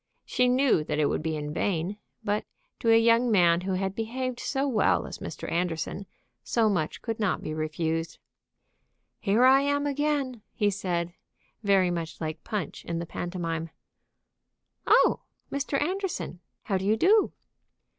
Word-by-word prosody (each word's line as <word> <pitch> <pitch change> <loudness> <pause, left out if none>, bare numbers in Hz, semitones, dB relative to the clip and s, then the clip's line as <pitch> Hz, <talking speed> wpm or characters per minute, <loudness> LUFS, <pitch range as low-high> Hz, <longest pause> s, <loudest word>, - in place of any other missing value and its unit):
She 250 0 +2
knew 255 - +3
that 150 - -2
it 150 - +3
would - - -1
be 160 0 -2
in 150 0 -4
vain; 185 +2 -1 0.3
but 205 +1 0 0.4
to 230 - +1
a 225 - +7
young 230 +1 +4
man 175 -5 +4
who 190 +1 -2
had 190 +1 -1
behaved 245 +3 -3
so 275 +1 -1
well 235 -6 +2
as - - -7
Mr. - - -6
Anderson 175 +2 -2 0.4
so 225 - +2
much 160 -5 -2
could 225 -2 -3
not 210 -4 0
be 155 - -3
refused. 160 +1 -2 1.0
"Here 215 +4 +3
I 265 +1 +7
am 285 +1 +1
again," 285 -4 -1
he 205 -3 +2
said, 175 -3 -2 0.5
very 195 -4 +3
much 165 -2 -4
like 155 -1 -4
Punch 210 -7 -4
in 170 - -3
the 170 - -3
pantomime. 165 -1 -4 1.2
"Oh, - - +5 0.3
Mr. 280 0 -1
Anderson! 370 - -2 0.2
how 195 -3 0
do 190 - -4
you 215 +2 +3
do?" 410 - +4
200 Hz, 155 wpm, -27 LUFS, 170-250 Hz, 1.2 s, a